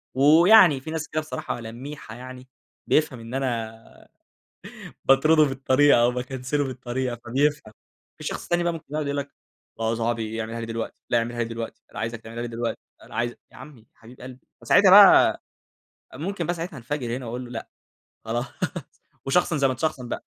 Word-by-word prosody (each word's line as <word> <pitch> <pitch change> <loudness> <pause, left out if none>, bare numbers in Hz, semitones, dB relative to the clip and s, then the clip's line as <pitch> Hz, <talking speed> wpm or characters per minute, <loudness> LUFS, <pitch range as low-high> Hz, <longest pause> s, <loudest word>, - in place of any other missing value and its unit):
ويعني 160 +2 +7
في 155 - -7
ناس 160 -2 -4
كده 155 +1 -1
بصراحة 125 -4 -5
لَميحة 120 +1 -9
يعني، 130 +1 -10 0.4
بيفهَم 150 -5 +1
إن 115 +1 -10
أنا 115 -4 -5 1.0
باطرُده 155 +4 +5
بالطريقة 135 -1 +3
أو 120 - +4
باكنسِله 130 +3 -2
بالطريقة، 130 -2 -4
فبيفهَم. 135 -1 0 0.5
في - - -10
شخص - - -5
تاني 175 0 +1
بقى 170 - +1
ممكن 165 -2 -8
يقعُد 155 -1 -1
يقول 140 - -2
لك: 140 0 -4 0.5
"آه 115 0 0
يا - - 0
صاحبي 115 -1 -2
اعمِلها 115 +1 -6
لي 115 - -5
دلوقتي، 115 0 -6
لا 120 - +4
أعمِلها 120 +1 -3
لي - - 0
دلوقتي، 115 0 -7
أنا - - -10
عايزَك 115 0 -4
تعمِلها 115 +1 -7
لي 120 - -4
دلوقتي، 115 0 -3 0.2
لأ - - -16
أنا - - -14
عايزَك". 120 +1 -2
يا - - -15
عمي 135 -1 -12
يا 110 - -26
حبيب 120 +3 -16
قلبي 130 0 -12
فساعتها - - +5
بقى - - +8 0.7
ممكن 170 +6 -4
بقى 175 - 0
ساعتها 165 -2 -6
انفجَر 125 -1 -4
هنا 130 -2 -7
وأقول 125 +2 -5
له: 120 - -11
"لأ، 115 -2 -6 0.6
خلاص." 120 +3 -2 0.8
وشخصن 155 +2 +2
زي 135 -1 +3
ما 130 - -1
تشخصن 130 -2 -3
بقى. - - -4
130 Hz, 185 wpm, -24 LUFS, 115-145 Hz, 1.0 s, بقى